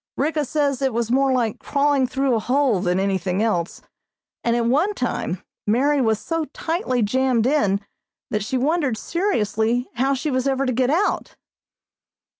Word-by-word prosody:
Ricka 300 +1 0
says 280 -2 0
it 265 -4 0
was 235 -1 -1
more 270 +1 +3
like 240 -4 0
crawling 280 -2 +1
through 265 0 0
a 225 - +2
hole 255 -3 +1
than 180 +1 +1
anything 190 0 0
else, 175 -6 -1 0.6
and 235 0 +1
at 235 -1 +1
one 310 - +2
time 200 - -3 0.2
Mary 275 +6 +2
was 220 -3 +2
so 330 +7 -2
tightly 305 - -2
jammed 250 +1 +1
in 250 -9 +2 0.5
that 210 -1 0
she 245 +4 -2
wondered 280 -3 +1
seriously 240 - 0
how 270 +3 +2
she 290 +3 -2
was 255 +1 0
ever 270 0 +1
to 255 - 0
get 250 +1 +1
out. 355 +8 0
255 Hz, 165 wpm, -22 LUFS, 225-285 Hz, 0.6 s, more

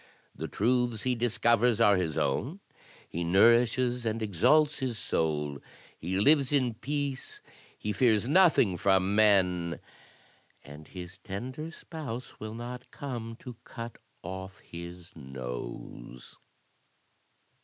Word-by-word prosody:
The 80 +4 -5
truths 120 +2 0
he 130 - +1
discovers 120 -1 +2
are 105 -3 +6
his 85 -4 -1
own, 125 - -1 0.5
he 85 - -4
nourishes 120 +6 +4
and 110 0 -1
exalts 125 - +3
his 130 -4 -2
soul; 75 -6 -1 0.4
he 90 +4 -3
lives 140 +4 +4
in 130 -5 +2
peace; 140 +2 -4 0.3
he 105 - -3
fears 110 0 +3
nothing 150 - +4
from 95 +1 +2
men; 90 -5 +3 0.8
and 75 +2 -12
his 90 0 -9
tender 125 +12 -6
spouse 145 -8 -7
will 110 +1 -6
not 120 +1 -7
come 120 -5 -6
to 125 -4 -9
cut 115 -1 -8 0.2
off 95 +2 -7
his 85 +1 -10
nose." 60 -3 -8
110 Hz, 115 wpm, -29 LUFS, 90-125 Hz, 0.8 s, are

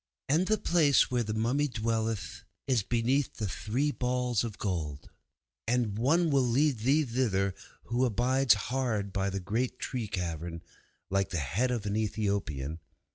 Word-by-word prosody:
And 160 +7 +2
the 215 - +3
place 155 -9 +3
where 125 -1 +2
the 110 -1 -2
mummy 125 +7 +1
dwelleth 115 -4 -2 0.2
is 130 -5 +2
beneath 120 +6 0
the 105 - -2
Three 125 +10 -1
Balls 125 -3 0
of 115 -3 -5
Gold. 80 -8 -3 0.6
And 115 -4 +1
one 155 +9 +2
will 140 -1 +4
lead 130 +1 +2
thee 140 +7 +3
thither 110 -6 0 0.3
who 120 +2 0
abides 125 +1 +3
hard 110 -3 -2
by 100 -1 0
the 100 0 -3
great 115 +7 -2
tree 120 -4 -3
carven 85 -3 -4 0.5
like 100 0 +1
the 90 - -2
head 90 - 0
of 120 -4 -2
an 100 0 -1
Ethiopian. 100 -9 -2
115 Hz, 155 wpm, -30 LUFS, 100-130 Hz, 0.6 s, will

